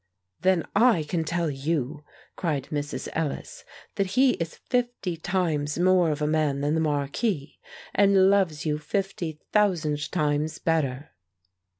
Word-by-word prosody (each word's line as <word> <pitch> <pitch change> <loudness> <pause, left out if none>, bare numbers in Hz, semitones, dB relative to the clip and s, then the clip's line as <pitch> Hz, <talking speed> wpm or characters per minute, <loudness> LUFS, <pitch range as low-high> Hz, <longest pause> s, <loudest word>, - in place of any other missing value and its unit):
"Then 185 -1 +2
I 220 -6 +5
can 165 +2 -1
tell 170 0 -1
you," 145 +1 -2 0.3
cried 150 -7 -2
Mrs. 145 -1 -3
Ellis, 165 - -4 0.3
"that 195 -1 +1
he 260 0 +6
is 165 -1 -4
fifty 240 -8 -2
times 160 -4 -1
more 180 -1 +4
of 150 0 -1
a - - +2
man 150 -3 +1
than 145 +1 +1
the 160 - +1
marquis, 145 - -1 0.3
and 195 -1 +5
loves 180 -7 +1
you 150 -1 0
fifty 180 -3 -3
thousand 165 -8 +1
times 150 -2 0
better!" 150 -3 -1
160 Hz, 135 wpm, -26 LUFS, 150-190 Hz, 0.3 s, he